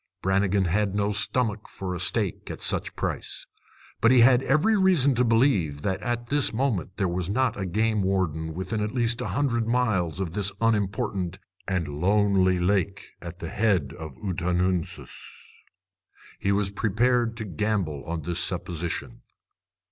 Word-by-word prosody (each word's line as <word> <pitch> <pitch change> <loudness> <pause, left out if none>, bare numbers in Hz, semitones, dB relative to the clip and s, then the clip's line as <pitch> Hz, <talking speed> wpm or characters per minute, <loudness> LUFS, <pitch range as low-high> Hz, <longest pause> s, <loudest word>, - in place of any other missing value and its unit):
Brannigan 95 0 +2
had 100 +3 0
no 100 0 +1
stomach 105 0 -1
for 95 -1 -5
a 90 - -4
steak - - 0
at - - -6
such - - -1
price. - - -3 0.6
But 115 - +5
he 125 -1 +6
had 125 +1 +6
every 155 +12 +3
reason 180 -9 +4
to 125 0 +2
believe 115 - +2
that 95 -1 -1
at 120 -1 -2
this 145 -1 +2
moment 110 - -1
there 95 - +1
was 90 0 -2
not 125 +2 +1
a 95 -2 -3
game 110 +3 +1
warden 80 -5 -1
within 95 +4 -3
at 105 +4 -3
least 115 -1 +1
a - - -2
hundred 120 +1 0
miles 110 -9 +1
of 95 -4 -2
this 100 0 -1
unimportant 100 -4 0 0.3
and 90 -4 -1
lonely 95 +4 +2
lake 95 +2 0
at 85 0 -8
the 95 - -6
head 95 -9 +1
of 80 -5 -8
the - - -21
Ottanoonsis. 90 -2 -2 0.8
He 100 - 0
was 100 0 +1
prepared 115 +3 +1
to 110 - -4
gamble 95 -6 -2
on 85 -1 -4
this 85 0 -1
supposition. 85 -2 -3
100 Hz, 160 wpm, -26 LUFS, 90-115 Hz, 0.8 s, he